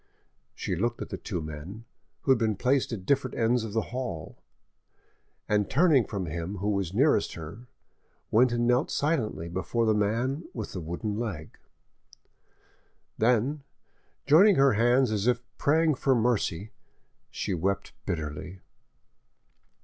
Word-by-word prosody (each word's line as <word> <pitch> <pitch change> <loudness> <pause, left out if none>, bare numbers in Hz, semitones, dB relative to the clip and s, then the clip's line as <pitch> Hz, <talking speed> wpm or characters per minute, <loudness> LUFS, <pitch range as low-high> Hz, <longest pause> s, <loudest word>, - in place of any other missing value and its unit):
She - - -3
looked 120 +6 -1
at - - -11
the - - -4
two 90 -6 -4
men, 80 +9 -8 0.4
who 135 - +2
had 130 - +4
been 110 -2 +1
placed 130 +6 +1
at 100 -5 -5
different 135 0 0
ends 115 +1 +2
of 110 -2 -6
the 110 -2 -1
hall, 120 -12 -5 1.1
and 105 -1 +1
turning 150 -5 +4
from 100 -4 -3
him 85 +4 -4
who 100 +3 -1
was 100 -4 -1
nearest 125 0 +2
to 85 - -8
her, 80 +7 -8 0.7
went 120 +3 +4
and 120 0 0
knelt 125 +5 +2
silently 130 - -1
before 95 +7 -1
the 110 - +3
man 115 +9 0
with 110 -4 -5
the 90 - -5
wooden 95 +6 -4
leg; 95 -10 -5 1.6
then, 125 +6 +2 0.6
joining 190 +7 +6
her 135 -3 +5
hands 120 +3 +3
as 105 +1 -1
if 125 -1 +3 0.2
praying 160 +2 +3
for 135 -1 +1
mercy, 110 -5 0 0.6
she 100 - -3
wept 95 +3 -2
bitterly. 80 +3 -4
110 Hz, 145 wpm, -28 LUFS, 95-130 Hz, 1.6 s, joining